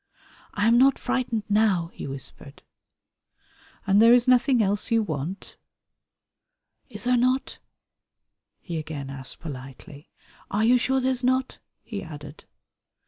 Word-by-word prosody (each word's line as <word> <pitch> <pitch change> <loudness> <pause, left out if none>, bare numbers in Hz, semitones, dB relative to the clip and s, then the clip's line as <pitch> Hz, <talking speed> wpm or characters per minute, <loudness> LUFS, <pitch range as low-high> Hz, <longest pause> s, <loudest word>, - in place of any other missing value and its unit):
"I 205 - +1
am 235 +1 +5
not 270 +1 +5
frightened 250 -4 -2
now," 205 -5 +2
he - - -7
whispered. 135 +1 -9 1.2
"And 200 +1 +4
there 230 +1 +7
is 245 +1 +4
nothing 250 0 +4
else 200 +3 0
you 230 -1 +2
want?" 160 +1 -6 1.3
"Is - - -8
there 250 0 +2
not?" 255 +2 0 1.0
he 170 -3 -6
again 145 -3 -6
asked 135 -1 -10
politely. 140 0 -10 0.4
"Are 210 +2 +1
you 245 +2 +5
sure 265 +2 +1
there's 255 0 0
not?" 260 +1 0 0.2
he 205 -4 -6
added. 150 -2 -10
210 Hz, 130 wpm, -25 LUFS, 155-250 Hz, 1.3 s, there